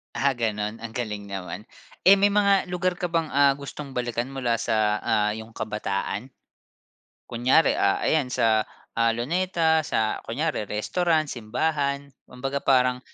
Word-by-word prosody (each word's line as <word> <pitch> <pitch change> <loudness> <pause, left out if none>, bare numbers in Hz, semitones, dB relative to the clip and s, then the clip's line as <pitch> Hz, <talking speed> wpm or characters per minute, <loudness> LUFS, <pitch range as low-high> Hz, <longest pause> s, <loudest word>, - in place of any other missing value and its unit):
Ah, 135 +2 +1
gano'n 105 -2 -2
ang 115 - -6
galing 105 -4 -4
naman. 95 0 -6 0.4
Eh, 195 +2 +7
may 205 - +5
mga 200 -2 +3
lugar 180 0 -1
ka 180 - -1
bang, 165 -2 -1
ah, 140 0 +4
gustong 140 -1 -8
balikan 120 0 -2
mula 125 -4 -1
sa, 105 -2 +1
ah, 105 0 +1
'yong 110 +1 -8
kabataan? 105 +2 -3 1.0
Kunyari, 130 +7 +3
ah, 100 - +3
ayan 150 -5 +2
sa, 110 -3 +2 0.3
ah, 115 0 +1
Luneta, 160 +3 +1
sa 110 -1 0
kunyari 115 -4 -2
restaurant, 155 +7 0
simbahan, 140 +4 -2 0.2
kumbaga 135 +2 -4
parang 125 -2 +3
125 Hz, 140 wpm, -25 LUFS, 110-155 Hz, 1.0 s, Eh